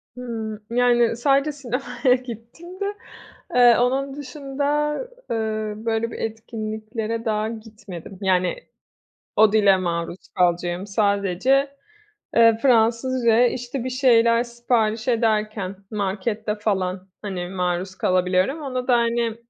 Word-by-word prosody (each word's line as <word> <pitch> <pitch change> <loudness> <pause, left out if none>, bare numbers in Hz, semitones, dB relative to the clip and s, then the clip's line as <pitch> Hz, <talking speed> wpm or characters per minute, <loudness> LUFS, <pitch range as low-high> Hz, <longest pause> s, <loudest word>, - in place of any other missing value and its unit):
Hıı, 225 -4 -5
yani, 240 -1 +3
sadece 275 +4 +2
sinemaya 260 -1 0
gittiğimde, 255 - -8 0.7
eee, 245 -2 +7
onun 270 +3 0
dışında, 290 +1 -2 0.3
eee, 215 -2 -2
böyle 225 0 0
bir - - -7
etkinliklere 220 0 -4
daha 215 -1 0
gitmedim. 210 -5 -10
Yani, 185 -2 +2 0.8
o 215 -1 +6
dile 200 -3 +5
maruz 170 0 -3
kalacağım 175 +1 +1
sadece, 205 +7 +1 0.6
eee, 230 -1 +6
Fransızcaya, 240 0 +3
işte, 245 +1 -4
bir 255 - -3
şeyler 235 -3 +4
sipariş 235 -1 -1
ederken 215 -4 0 0.2
markette 210 +1 -2
falan, 190 -3 -2
hani, 185 -4 -4
maruz 180 0 -2
kalabiliyorum. 185 - +1
Onu 255 -3 -4
da, 255 - +4
hani, 235 -1 0
225 Hz, 110 wpm, -23 LUFS, 200-250 Hz, 0.8 s, eee